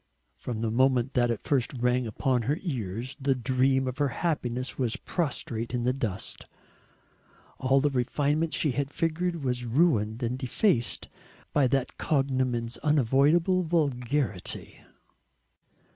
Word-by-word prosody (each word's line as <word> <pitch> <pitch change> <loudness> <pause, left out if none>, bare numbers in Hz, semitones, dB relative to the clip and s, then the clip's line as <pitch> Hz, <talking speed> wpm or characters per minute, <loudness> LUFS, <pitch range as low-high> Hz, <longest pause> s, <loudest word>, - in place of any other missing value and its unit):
From 115 -3 -5
the 115 -1 0
moment 130 +1 +2
that 120 -1 +2
it 115 - -2
first 135 -4 +1
rang 125 0 +1
upon 125 +3 0
her 140 +7 0
ears, 125 - -4
the 135 0 +2
dream 130 +1 +1
of 130 +2 -4
her 145 - +3
happiness 130 -4 -2
was 125 -4 -1
prostrate 125 -8 -3
in 120 - -1
the 125 +1 +2
dust. 115 -8 -4 1.1
All 135 +1 +3
the 145 - +2
refinement 145 +5 0
she 150 - +2
had 140 +2 -1
figured 165 +1 -1
was 125 -1 -1
ruined 115 -4 +2
and 125 +2 -1
defaced 130 - +1 0.5
by 145 -3 +4
that 130 0 -1
cognomen's 130 -5 0
unavoidable 150 - +3
vulgarity. 140 - -1
130 Hz, 130 wpm, -28 LUFS, 120-145 Hz, 1.1 s, by